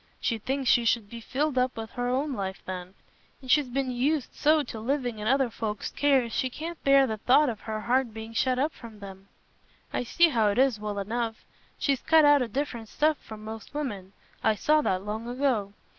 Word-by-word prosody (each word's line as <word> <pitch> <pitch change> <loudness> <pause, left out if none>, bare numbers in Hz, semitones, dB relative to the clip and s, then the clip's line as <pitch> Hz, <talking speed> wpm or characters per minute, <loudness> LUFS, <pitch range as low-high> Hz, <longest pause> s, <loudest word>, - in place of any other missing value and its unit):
She 230 -2 -1
thinks 265 +4 -2
she 240 - +5
should 225 -3 0
be 235 0 -7
filled 270 +3 -1
up 250 -1 0
with 225 0 -6
her 245 0 -3
own 275 +3 0
life 190 -4 -4
then, 185 0 -6 0.4
and 260 -2 -4
she's 295 -3 +4
been 260 +1 -1
used 270 +3 0
so 305 0 +3
to 230 -4 -7
living 245 -1 -2
in 210 - -3
other 265 -1 +2
folks's 215 -2 -4
cares, 265 -5 +2
she 260 - 0
can't 325 +6 -7
bear 275 0 +6
the 220 -4 -3
thought 265 +6 +4
of 220 -4 -5
her 215 -1 -5
heart 250 +1 +1
being 220 +1 -8
shut 255 +2 +1
up 290 +5 0
from 220 -3 -12
'em. 195 0 -10 0.7
I - - 0
see 340 +8 +4
how 225 -7 +2
it 205 - 0
is, 260 -4 +3
well 210 -1 -4
enough. 225 +2 -3 0.3
She's 275 -3 0
cut 320 -1 +5
out 290 -1 +6
o' 250 - 0
different 235 -2 -4
stuff 310 0 +2
from 215 -1 -11
most 220 +4 -9
women: 205 -10 -4 0.3
I 220 -1 +3
saw 305 +8 +3
that 190 -7 -1
long 220 +2 -4
ago. 245 -6 0
245 Hz, 215 wpm, -27 LUFS, 215-275 Hz, 0.7 s, bear